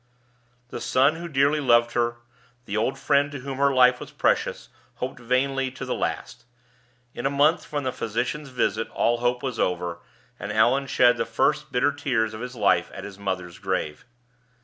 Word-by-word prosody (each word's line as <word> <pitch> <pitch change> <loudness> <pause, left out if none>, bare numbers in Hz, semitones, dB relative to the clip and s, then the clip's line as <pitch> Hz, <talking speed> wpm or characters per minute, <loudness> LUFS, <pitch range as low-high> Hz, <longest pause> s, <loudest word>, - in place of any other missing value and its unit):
The - - -6
son 140 +5 +3
who 170 +1 -6
dearly 140 0 +2
loved 120 -4 +4
her, 120 0 0 0.5
the 100 - -4
old 110 +5 0
friend 145 0 +2
to 145 -3 -7
whom 135 0 -6
her 140 0 +4
life 125 -1 +5
was - - -8
precious, - - 0 0.3
hoped 130 - -5
vainly 130 +2 0
to 130 - -7
the - - -2
last. - - -4 0.7
In 120 - -2
a - - +1
month 145 +4 +3
from 145 -1 -3
the 130 - -1
physician's 125 +7 -3
visit 125 -3 -1
all 120 0 +1
hope 125 0 0
was 130 -4 -3
over; 90 -1 -1 0.4
and 100 - -5
Allan 120 +6 +3
shed 125 -1 +4
the - - -1
first - - 0
bitter 125 +3 +2
tears 125 -6 -1
of 110 - -7
his 125 0 -6
life 100 -6 +2
at 95 - -7
his 100 -1 -9
mother's 90 -3 -4
grave. 95 -4 -3
125 Hz, 185 wpm, -25 LUFS, 110-140 Hz, 0.7 s, life